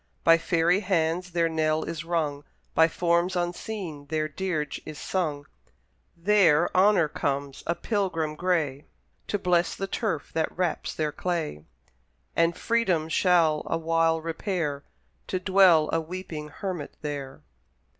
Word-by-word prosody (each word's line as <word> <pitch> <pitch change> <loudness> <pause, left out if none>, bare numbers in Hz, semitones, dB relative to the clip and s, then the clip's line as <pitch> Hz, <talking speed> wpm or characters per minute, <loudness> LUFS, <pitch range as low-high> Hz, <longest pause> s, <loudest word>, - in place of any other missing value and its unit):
By 165 0 +6
fairy 170 +2 +2
hands 180 -2 0
their 170 -1 +1
knell 155 -1 0
is 160 -2 -5
rung, 155 -4 -1 0.3
By 160 0 +5
forms 170 +2 +1
unseen 175 -3 -4
their 155 0 -1
dirge 155 -1 -3
is 155 - -8
sung; 150 -7 -2 0.7
There 175 -3 +3
Honour 190 -3 +5
comes, 140 -1 -3
a 170 - +1
pilgrim 180 -9 -1
gray, 155 -5 -1 0.4
To 205 - 0
bless 180 -2 +1
the 195 - -3
turf 195 -6 -3
that 160 0 -1
wraps 180 -3 -1
their 155 -1 -1
clay; 160 - -3 0.7
And 165 0 +2
Freedom 190 -9 +1
shall 165 -3 +3
awhile 165 0 +1
repair, 165 -3 -2 0.4
To 185 - -1
dwell 185 -5 +5
a 165 - +2
weeping 160 -2 -6
hermit 175 -1 -5
there! 140 -3 -5
165 Hz, 130 wpm, -26 LUFS, 155-180 Hz, 0.7 s, By